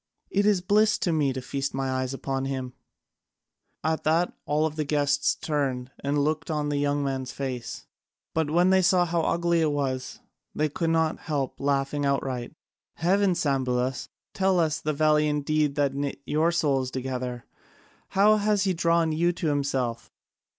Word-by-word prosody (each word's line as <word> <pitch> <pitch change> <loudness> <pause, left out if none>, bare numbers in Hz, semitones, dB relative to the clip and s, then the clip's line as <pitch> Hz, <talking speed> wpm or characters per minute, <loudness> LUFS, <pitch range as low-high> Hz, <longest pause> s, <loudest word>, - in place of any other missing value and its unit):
It 200 +1 +2
is 200 -4 +3
bliss 210 +3 +3
to 175 - 0
me 145 -4 +2
to 130 -1 -5
feast 135 +2 -3
my 135 -1 -1
eyes 130 0 -1
upon 135 0 -3
him." 130 -2 -4 1.1
At 160 +1 0
that 165 +3 +2
all 150 +2 +2
the 155 0 -2
guests 145 -1 +1
turned 135 -4 -2
and 140 +1 0
looked 155 +2 -1
on 150 -2 -1
the 145 -1 0
young 145 0 0
man's 130 -2 -3
face, 125 - -5 0.5
but 160 -2 0
when 175 +4 +3
they 190 0 +5
saw 180 0 +4
how 170 0 0
ugly 170 +1 +1
it 155 -2 +2
was, 130 -3 -3 0.4
they 155 0 +1
could 165 +3 -1
not 160 -1 +1
help 140 -4 -3
laughing 140 +1 0
outright. 135 -1 -2 0.4
"Heavens, 185 0 +2
Sambulas, 130 -3 0 0.2
tell 190 -2 +2
us 160 -2 +1
the 155 - -1
valiant 150 -1 +2
deed 155 -2 +1
that 140 -2 +1
knit 140 0 -3
your 160 +3 +2
souls 140 -6 +1
together! 125 -2 -4 0.6
How 210 +2 +4
has 205 -1 +1
he 190 -2 +1
drawn 165 -1 +2
you 170 +3 +2
to 170 -2 -2
himself?" 135 -5 -1
145 Hz, 165 wpm, -26 LUFS, 135-165 Hz, 1.1 s, they